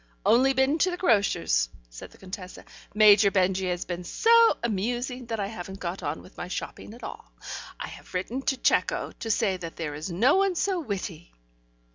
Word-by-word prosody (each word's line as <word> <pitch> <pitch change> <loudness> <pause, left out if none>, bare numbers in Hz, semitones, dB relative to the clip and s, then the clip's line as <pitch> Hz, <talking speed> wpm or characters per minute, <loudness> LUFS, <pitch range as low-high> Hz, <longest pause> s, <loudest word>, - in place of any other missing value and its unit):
"Only 265 +3 +5
been 265 +4 +2
to 370 - +3
the 355 - -3
grocer's," 200 - +2 0.2
said - - -10
the - - -19
Contessa. 185 -1 -9 0.3
"Major 210 -1 +7
Benjy 190 -1 +1
has 175 0 -2
been 175 0 -5
so 460 - +5
amusing 240 +4 -2
that 225 -2 -3
I 200 - 0
haven't 195 -2 -7
got 180 +1 -4
on 145 +2 -4
with 185 - -17
my - - -5
shopping 205 +3 -6
at 240 - -15
all. - - -9 0.5
I - - -4
have - - -12
written 220 +9 -2
to 270 0 0
Cecco, - - +1
to 225 - -5
say 205 -3 +1
that 170 -2 -8
there 160 -3 -4
is 150 +5 -5
no 230 - +3
one 390 -1 +2
so 375 +1 0
witty." 190 - -5
205 Hz, 190 wpm, -27 LUFS, 180-260 Hz, 0.5 s, Major